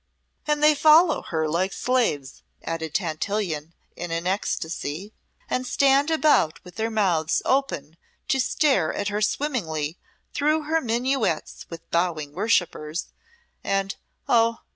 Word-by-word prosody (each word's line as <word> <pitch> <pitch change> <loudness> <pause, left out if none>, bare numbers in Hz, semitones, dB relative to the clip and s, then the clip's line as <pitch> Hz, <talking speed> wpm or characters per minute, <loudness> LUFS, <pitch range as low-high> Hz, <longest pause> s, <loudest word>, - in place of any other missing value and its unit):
"And 300 0 +1
they 305 0 +7
follow 310 +3 +5
her 160 -2 -2
like 175 +5 0
slaves," 190 - -1 0.2
added 160 -1 -4
Tantillion, 170 -2 -2 0.2
in 175 - -5
an 165 +1 -3
ecstacy, 180 0 -3 0.3
"and 255 0 -2
stand 275 +3 +3
about 305 - +3
with 180 +2 -14
their 225 +1 -1
mouths 180 -7 +1
open 170 - -1 0.3
to 265 - +2
stare 260 - +2
at 205 0 -2
her 210 +1 -2
swimming 250 - 0 0.7
though 305 +2 +2
her 320 +2 +1
minuets 240 - -1
with 165 -1 -10
bowing 165 -4 0
worshippers, 175 -6 0 0.5
and 195 0 -1 0.3
oh! 230 -1 +3
205 Hz, 125 wpm, -24 LUFS, 165-265 Hz, 0.7 s, they